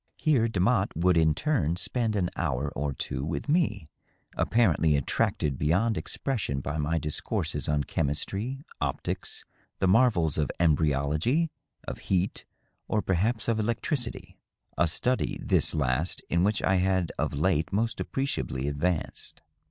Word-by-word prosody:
Here 135 -8 +3
Demotte 100 0 +1
would 90 +3 +3
in 80 -2 +4
turn 85 - +1
spend 110 +4 0
an 90 -3 0
hour 70 +3 -1
or 70 0 -2
two 65 0 -4
with 80 - -3
me, 145 - +1 0.5
apparently 85 -9 +3
attracted 70 0 0
beyond 95 +10 +2
expression 105 - -2
by 75 +3 -3
my 75 +3 0
discourses 75 -1 -2
on 75 -1 +2
chemistry, 100 - -2 0.2
optics, - - -3 0.3
the 95 - +1
marvels 95 - +3
of 75 - +1
embryology, 80 - +2 0.4
of - - -5
heat, 95 0 0 0.4
or 105 - 0
perhaps 105 +5 0
of 115 -1 +1
electricity 120 +3 -2 0.2
— - - -41
^a 85 - +2
study, 125 +10 0
this - - +1
last, 70 +3 0
in 85 +1 +3
which 105 +2 +1
I 95 - +3
had 95 -2 +1
of - - -1
late 80 0 +1
most 115 +4 0
appreciably 135 - -2
advanced. 75 +4 -2
90 Hz, 140 wpm, -28 LUFS, 75-115 Hz, 0.5 s, in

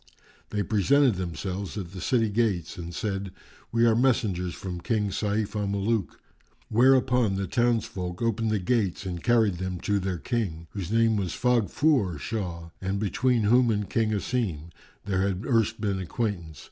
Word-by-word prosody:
They 105 -1 -1
presented 125 +7 +3
themselves 95 +2 -4
at 90 -4 -5
the 95 -1 -8
city 115 -4 +2
gates 100 -6 0
and 85 -1 -7
said, 95 -1 -3 0.4
"We 115 0 +3
are 115 -1 +4
messengers 110 -9 +1
from 90 -2 -6
King 105 0 0
Sayf 105 +1 -1
al 105 -1 -1
Muluk." 100 +1 -1 0.5
Whereupon 125 -2 +4
the 95 0 -1
townsfolk 110 -6 -1
opened 115 -1 0
the 110 - +1
gates 100 -1 0
and 90 -2 -4
carried 110 -7 +3
them 95 -1 -3
to 100 -1 +1
their 95 -1 -2
King, 85 - -2
whose 100 -3 -5
name 115 -1 +3
was 95 -4 -2
Faghfúr[FN#395] 125 - +2
Shah 85 -4 -4
and 95 +1 -1
between 120 +3 +1
whom 120 +3 +4
and 105 -2 0
King 115 -1 +1
Asim 100 - -2 0.3
there 95 -2 0
had 95 +1 -1
erst 115 -3 +1
been 100 -3 -1
acquaintance. 90 - -3
105 Hz, 160 wpm, -27 LUFS, 95-115 Hz, 0.5 s, are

